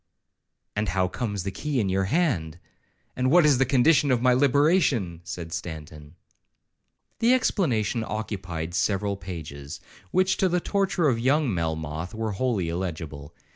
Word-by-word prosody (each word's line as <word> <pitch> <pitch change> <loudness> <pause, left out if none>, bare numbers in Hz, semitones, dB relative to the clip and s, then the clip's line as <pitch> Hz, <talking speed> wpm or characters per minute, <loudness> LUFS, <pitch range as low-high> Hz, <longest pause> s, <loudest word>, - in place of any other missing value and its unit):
'—'And 105 -1 0
how 95 +1 +1
comes 105 -1 -3
the 95 - -3
key 140 +7 -2
in 105 - +1
your 95 0 +1
hand? 95 - 0 0.6
and 130 0 +1
what 170 +2 +6
is 140 -4 +4
the 135 - +3
condition 140 +2 +4
of 125 -2 +3
my 125 +1 +4
liberation?' 140 - +2
said 85 0 -6
Stanton. 80 -3 -7 1.0
The 240 +2 +5
explanation 120 - 0
occupied 90 -7 -4
several 100 +4 0
pages, 80 -7 -8 0.3
which, 185 - +2
to 190 - +2
the 180 +1 +1
torture 190 -3 0
of 120 -5 +1
young 135 0 +2
Melmoth, 80 +2 -3
were 110 -1 -2
wholly 105 -4 -1
illegible. 80 -4 -5
105 Hz, 145 wpm, -25 LUFS, 85-140 Hz, 1.0 s, what